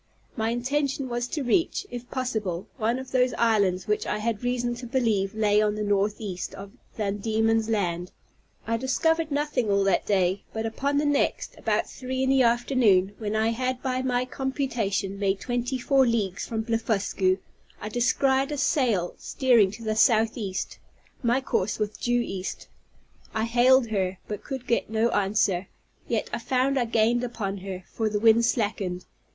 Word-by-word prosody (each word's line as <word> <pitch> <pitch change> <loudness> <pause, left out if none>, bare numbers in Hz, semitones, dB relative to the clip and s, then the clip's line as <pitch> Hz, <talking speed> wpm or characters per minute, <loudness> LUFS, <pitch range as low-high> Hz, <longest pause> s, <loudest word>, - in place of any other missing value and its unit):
My 225 -1 0
intention 270 +3 -1
was 240 0 -2
to 290 +2 -3
reach, 335 +10 +1
if 245 0 -7
possible, 215 -8 -2
one 230 +1 0
of 260 0 -8
those 255 -1 +2
islands 200 -6 +2
which 210 0 -1
I - - -1
had 220 +1 -2
reason 245 -1 0
to 245 0 -7
believe 220 -6 0
lay 210 -1 +3
on 210 -1 +1
the 210 - -2
northeast 205 -2 -1
of 195 +1 -9 0.3
Van 205 -2 -1
Diemen's 225 +1 +1
Land. 180 -4 -1 0.5
I 230 0 0
discovered 320 +6 +1
nothing 285 -6 0
all 200 0 +3
that 195 -2 +1
day; 190 -1 +2
but 220 0 -3
upon 280 +6 -1
the 295 - +2
next, 290 -1 0
about - - 0
three 260 0 -4
in 265 - +2
the 270 -1 +4
afternoon, 235 -5 +3
when 215 -1 -2
I 220 +1 +2
had 255 +2 -2
by 255 -1 -1
my 250 -1 0
computation 230 -8 -2
made 195 -1 +1
twenty 245 +1 -2
four 265 +1 +3
leagues 205 -5 -1
from 220 -1 -2
Blefuscu, 205 -4 0 0.4
I 210 - -5
descried 265 +4 +1
a 295 - -2
sail 235 - +1
steering 240 -7 +3
to 210 +4 -9
the 215 -1 -1
southeast; 220 -3 +1 0.4
my 245 +2 +2
course 205 -6 -1
was 210 - 0
due 240 +3 0
east. 195 -5 -5 0.7
I 220 - +1
hailed 245 +1 +4
her, 190 -3 -1
but 210 -2 -5
could 265 -3 -6
get 235 - 0
no 220 +1 +2
answer; 195 -3 +1 0.4
yet - - -1
I - - -1
found 265 +1 +1
I 245 - +1
gained 230 +1 +2
upon 205 -5 -3
her, 190 -1 -6
for 220 -1 0
the 210 0 -1
wind 225 +1 +5
slackened. 200 -6 -1
225 Hz, 170 wpm, -26 LUFS, 205-255 Hz, 0.7 s, wind